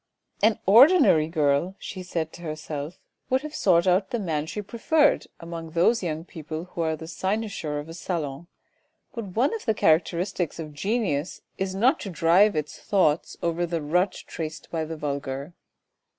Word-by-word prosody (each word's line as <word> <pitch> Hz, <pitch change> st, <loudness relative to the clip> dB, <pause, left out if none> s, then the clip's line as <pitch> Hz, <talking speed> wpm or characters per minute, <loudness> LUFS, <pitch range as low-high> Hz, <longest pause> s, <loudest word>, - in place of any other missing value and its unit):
,c 210 Hz, -, +6 dB
An 220 Hz, -, 0 dB
ordinary 240 Hz, -, +7 dB
girl," 155 Hz, +3 st, +1 dB
she 185 Hz, -, -7 dB
said 165 Hz, -3 st, -3 dB
to -, -, -11 dB
herself, 155 Hz, 0 st, -5 dB, 0.2 s
" -, -, -50 dB
would 260 Hz, +2 st, +1 dB
have 305 Hz, 0 st, -6 dB
sought 170 Hz, -, +3 dB
out 185 Hz, +1 st, +2 dB
the 240 Hz, -, -1 dB
man 160 Hz, -7 st, -2 dB
she 210 Hz, -, -5 dB
preferred 285 Hz, +9 st, +2 dB
among 165 Hz, -1 st, -7 dB
those 175 Hz, +8 st, +3 dB
young 160 Hz, -2 st, -3 dB
people 160 Hz, -1 st, -6 dB
who 170 Hz, -, -3 dB
are 160 Hz, -1 st, 0 dB
the 160 Hz, +1 st, -9 dB
cynosure 190 Hz, -4 st, -2 dB
of 145 Hz, +1 st, -5 dB
a 165 Hz, -, -8 dB
salon; 165 Hz, -3 st, -4 dB, 0.7 s
but 230 Hz, -3 st, -5 dB
one 255 Hz, -, +2 dB
of 450 Hz, -, -5 dB
the 220 Hz, -3 st, +1 dB
characteristics 170 Hz, +1 st, +1 dB
of 155 Hz, -2 st, -7 dB
genius 180 Hz, -3 st, -1 dB, 0.2 s
is 190 Hz, 0 st, -2 dB
not 250 Hz, +10 st, +3 dB
to 200 Hz, -, -6 dB
drive 180 Hz, +5 st, +4 dB
its 150 Hz, -1 st, -3 dB
thoughts 170 Hz, -6 st, +1 dB
over 170 Hz, +1 st, 0 dB
the 170 Hz, -1 st, -1 dB
rut 180 Hz, +6 st, +1 dB
traced 160 Hz, -1 st, -6 dB
by 165 Hz, -1 st, -1 dB
the 160 Hz, +1 st, -6 dB
vulgar. 140 Hz, +1 st, -4 dB
170 Hz, 180 wpm, -25 LUFS, 155-200 Hz, 0.7 s, ordinary